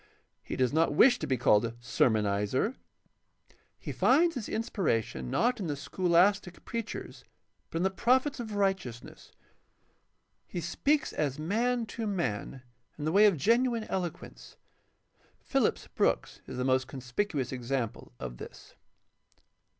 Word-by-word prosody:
He - - -6
does 130 0 +1
not 160 -2 +2
wish 245 - +6
to - - -3
be 130 - +1
called 105 -3 +4
a 115 0 -3
sermonizer. 110 - +1 1.0
He - - -6
finds 330 +6 +4
his 245 -6 -5
inspiration, 115 - -1
not 245 - +1
in 190 - -3
the 145 - -2
scholastic 180 +4 +1
preachers, 230 -2 -5 0.5
but - - -4
in 170 - 0
the 190 - +2
prophets 260 +7 +2
of 220 -3 -5
righteousness. 190 - -3 1.2
He 175 - -4
speaks 275 - 0
as 140 -3 -1
man 230 +9 0
to 225 0 -5
man 130 - -3 0.3
in 150 - -5
the 155 - +1
way 205 +4 +7
of 195 -5 +2
genuine 235 - +2
eloquence. 155 - -6 0.8
Phillips - - 0
Brooks - - 0
is - - -7
the 125 - -1
most 130 0 +2
conspicuous 130 +1 -3
example 125 -2 -3
of - - -6
this. - - -11
170 Hz, 135 wpm, -30 LUFS, -, 1.2 s, way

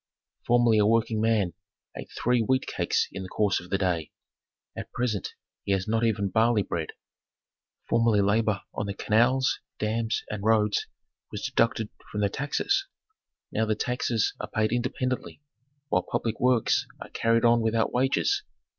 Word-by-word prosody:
"Formerly 120 -2 +4
a 105 - +4
working 115 -1 +2
man 110 -6 +2 0.4
ate - - -8
three 125 0 +2
wheat 130 +4 +1
cakes - - 0
in 95 - -6
the 95 - -7
course 105 0 +1
of 90 - -12
the 95 - +1
day; 90 -5 -1 0.7
at - - -7
present 115 -6 -2 0.3
he 100 - 0
has 95 +1 -1
not 115 +1 +1
even 100 -3 +1
barley 110 0 +3
bread. 80 -4 -4 0.9
Formerly 115 -2 +3
labor 105 0 +1
on 105 - -3
the 100 - -4
canals, 120 +6 +2 0.2
dams, 110 +1 -1
and 105 -1 -5
roads 105 -1 +2 0.4
was - - -5
deducted 115 -2 +1 0.2
from 105 - -2
the 100 - +2
taxes; 390 - -1 0.6
now 110 0 0
the 110 - +1
taxes 120 -1 0
are 105 - -5
paid 110 0 0
independently 125 +2 -2 0.5
while 90 - +2
public 115 +4 -3
works 125 -2 +2
are - - -9
carried 115 0 +2
on 120 0 +5
without 115 0 +1
wages. 135 - +2
110 Hz, 155 wpm, -27 LUFS, 105-120 Hz, 0.9 s, on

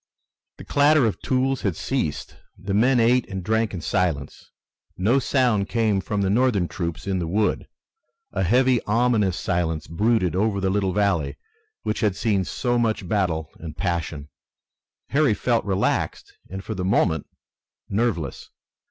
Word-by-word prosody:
The - - -10
clatter 145 -1 +4
of 110 - -2
tools 130 0 0
had 95 -5 -1
ceased. - - -3 0.2
The 95 +1 -4
men 120 +5 +4
ate 120 +2 +3
and 95 -2 -5
drank 110 +1 +1
in 90 - -5
silence. 85 -7 -2 0.5
No 110 +9 +3
sound 120 -7 +1
came 110 -4 +1
from 105 0 -2
the 95 - +1
Northern 110 -5 +2
troops 85 -2 -4
in 95 -2 -1
the 85 - -2
wood. 105 +5 0 0.6
A - - -2
heavy, 125 +6 +3
ominous 110 -5 +2
silence 80 -3 -1
brooded 100 +1 +1
over 100 +1 +1
the 95 -1 0
little 95 -1 +1
valley 90 -8 0 0.5
which 110 - -2
had 105 -4 +1
seen 100 -2 0
so 120 +4 -1
much 110 -4 0
battle 85 -6 -1
and 80 -2 -8
passion. 80 -5 -3 0.8
Harry 140 -6 +3
felt 120 +2 0
relaxed 95 -2 -1
and 95 +1 -6
for 110 - -4
the 95 -3 -4
moment 90 -5 +1 0.6
nerveless. 100 - -2
100 Hz, 150 wpm, -23 LUFS, 90-115 Hz, 0.8 s, clatter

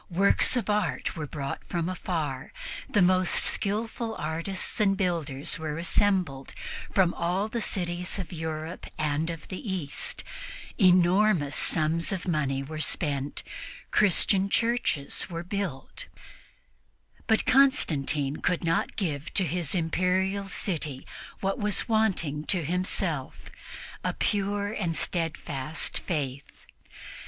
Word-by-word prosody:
Works 195 +7 +4
of 240 - -1
art 210 0 0
were 155 -3 -4
brought 140 -1 -4
from 170 -2 -2
afar, 160 -7 -3 0.4
the 205 - +4
most 185 0 +4
skillful 225 +2 -1
artists 165 +5 -1
and 195 -2 +3
builders 165 -8 -1
were 155 -1 -3
assembled 175 -6 +1 0.4
from 185 -3 +3
all 180 +4 0
the 235 +1 -3
cities 175 -2 -1
of 185 -3 -5
Europe 160 +1 -5
and 155 +1 0
of 165 -2 -6
the 185 - -5
East, 165 -7 -2 0.6
enormous 180 -4 +4
sums 160 +1 +2
of 190 -2 -3
money 140 -5 0
were 155 +3 -6
spent, 145 -4 -1 0.5
Christian 195 0 +3
churches 230 -13 +1
were 170 -1 -4
built; 195 - -4 1.2
but 220 -1 +3
Constantine 155 - +3
could 180 - 0
not 165 0 0
give 155 -6 -2
to 195 - +5
his 175 -1 0
Imperial 185 +3 +1
city 155 -9 -2 0.4
what 195 0 0
was 210 -1 +1
wanting 190 -10 +1
to 180 -5 +1
himself 175 -4 -2 0.5
a - - -1
pure 205 0 0
and 170 -7 -1
steadfast 160 -4 -1
faith. 140 -5 -4
175 Hz, 120 wpm, -28 LUFS, 155-195 Hz, 1.2 s, to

